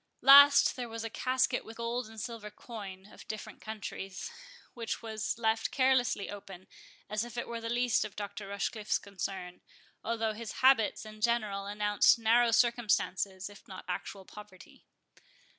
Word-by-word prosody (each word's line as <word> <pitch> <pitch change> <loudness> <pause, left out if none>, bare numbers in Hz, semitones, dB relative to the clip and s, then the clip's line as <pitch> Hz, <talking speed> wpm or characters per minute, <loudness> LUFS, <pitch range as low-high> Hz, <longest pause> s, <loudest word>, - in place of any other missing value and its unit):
Last, 285 +1 +8
there 245 -2 -5
was 225 0 -5
a 225 - -5
casket 255 0 +1
with 225 - -11
gold 235 +1 -2
and 220 0 -10
silver 220 0 -6
coin 200 -4 -9
of - - -14
different 215 -1 -7
countries, 200 -3 -6 0.4
which 230 -1 -4
was 220 -1 -3
left 225 -1 +1
carelessly 255 -6 +2
open, 195 -2 -9 0.4
as 215 +1 -1
if 240 0 -9
it 240 - -3
were 235 -1 -5
the 230 - -4
least 240 -1 +2
of 215 -2 -8
Dr. 205 0 -6
Rochecliffe's 205 +2 -1
concern, 190 -2 -6 0.4
although 225 -1 -1
his 220 0 -7
habits 245 -5 +4
in 215 0 -11
general 210 -4 0
announced 205 +1 +3
narrow 230 +1 +4
circumstances, 205 -5 +1
if 205 -1 -14
not 185 -1 -9
actual 190 +2 -5
poverty. 210 -3 -14
220 Hz, 155 wpm, -31 LUFS, 200-235 Hz, 0.4 s, Last